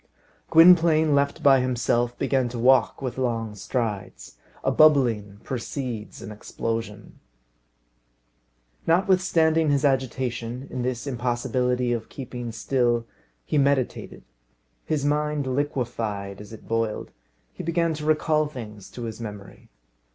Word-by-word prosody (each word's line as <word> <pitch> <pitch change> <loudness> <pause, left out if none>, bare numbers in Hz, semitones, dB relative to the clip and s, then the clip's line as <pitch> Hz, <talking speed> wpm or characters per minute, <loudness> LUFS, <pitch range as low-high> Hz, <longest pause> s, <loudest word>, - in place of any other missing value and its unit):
Gwynplaine, 165 -2 +6
left 140 0 +1
by 135 -2 +6
himself, 120 -1 0
began 135 -2 +1
to 120 - -6
walk 130 +2 +3
with 130 0 -4
long 115 -4 -1
strides. 105 - -4 0.3
A - - +2
bubbling 120 -10 +3
precedes 125 -3 -5
an 110 - -7
explosion. 105 0 -5 1.7
Notwithstanding 165 -3 +3
his 145 0 +2
agitation, 130 -2 -1
in 125 - -3
this 125 0 -2
impossibility 125 -1 0
of 115 -2 -4
keeping 120 -3 -6
still, 120 +1 0 0.4
he 150 - +1
meditated. 140 -2 0 0.6
His 150 -3 -1
mind 150 0 0
liquefied 115 -7 -3
as 105 - -12
it 110 - -12
boiled. 115 -1 -2 0.4
He - - -7
began 170 0 0
to 150 0 -6
recall 155 0 +2
things 110 -8 -9
to 120 - -7
his 115 0 -6
memory. 105 -3 -9
125 Hz, 120 wpm, -25 LUFS, 115-145 Hz, 1.7 s, Gwynplaine